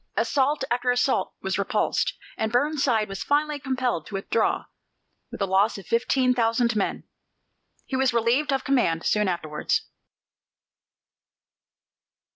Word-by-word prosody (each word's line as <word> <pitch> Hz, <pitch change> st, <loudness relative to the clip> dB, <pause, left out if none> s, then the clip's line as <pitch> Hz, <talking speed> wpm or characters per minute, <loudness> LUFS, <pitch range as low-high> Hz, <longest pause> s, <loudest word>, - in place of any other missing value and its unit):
Assault 285 Hz, 0 st, +1 dB
after 245 Hz, +1 st, 0 dB
assault 245 Hz, 0 st, +1 dB
was -, -, -1 dB
repulsed, -, -, 0 dB, 0.2 s
and 220 Hz, -, -2 dB
Burnside 255 Hz, -4 st, +1 dB
was 195 Hz, 0 st, -5 dB
finally 295 Hz, 0 st, +1 dB
compelled 255 Hz, -, -2 dB
to -, -, -7 dB
withdraw 205 Hz, +3 st, 0 dB, 0.7 s
with -, -, -8 dB
a -, -, +2 dB
loss 195 Hz, +4 st, +2 dB
of 195 Hz, -, -10 dB
fifteen 250 Hz, +4 st, +2 dB
thousand 235 Hz, 0 st, +1 dB
men. 200 Hz, -, -1 dB, 0.8 s
He 265 Hz, -, -4 dB
was 265 Hz, 0 st, +2 dB
relieved 235 Hz, +6 st, +1 dB
of 270 Hz, -1 st, 0 dB
command 205 Hz, -12 st, +1 dB
soon 210 Hz, -1 st, +2 dB
afterwards. 155 Hz, -4 st, -1 dB
240 Hz, 125 wpm, -25 LUFS, 210-265 Hz, 0.8 s, a